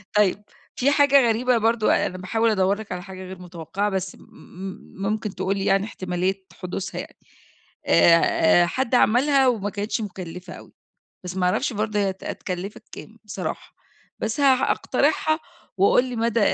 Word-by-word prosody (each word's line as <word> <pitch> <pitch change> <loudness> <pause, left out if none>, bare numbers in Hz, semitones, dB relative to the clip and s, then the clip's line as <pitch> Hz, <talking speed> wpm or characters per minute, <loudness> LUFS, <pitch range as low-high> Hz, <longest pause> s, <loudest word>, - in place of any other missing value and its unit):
طيب، 205 0 +2 0.3
في 275 +3 +2
حاجة 280 -3 +5
غريبة 245 +2 +2
برضه، 225 0 +2
أنا 185 - -4
باحاول 225 +5 0
أَدَوّر 195 -1 +2
لك 220 - -9
على 180 0 -4
حاجة 190 -1 -9
غير 185 0 -9
متوقعة 180 +3 -3
بس 190 -1 -3
م - - -20
م 190 +1 -11
ممكن 215 -1 -2
تقول 190 +1 -1
لي 195 - -2
يعني 195 +1 +2
احتمالية 185 -1 -3
حدوثها 185 +1 -5
يعني، - - -13 0.7
آآ 165 0 +5
آآ - - +3
حد 255 +4 -1
عملها 265 +4 +4
وما 210 -5 0
كانتش 205 +2 -3
مُكَلّفة 180 -3 -7
أوي - - -13 0.5
بس 180 +1 -6
ما 180 - +1
أعرفش 240 +6 0
برضه 210 0 -1
هي 200 -1 +1
هت 190 - -13
هتكَلّفك 185 +2 -5
كام - - -11
بصراحة، - - -6 0.4
بس 225 +6 -2
ه 275 -2 +6
هاقترحها 310 +4 +1 0.4
وقُل 200 +6 +4
لي 245 - -5
مدى 230 0 0
200 Hz, 165 wpm, -23 LUFS, 185-230 Hz, 0.7 s, ه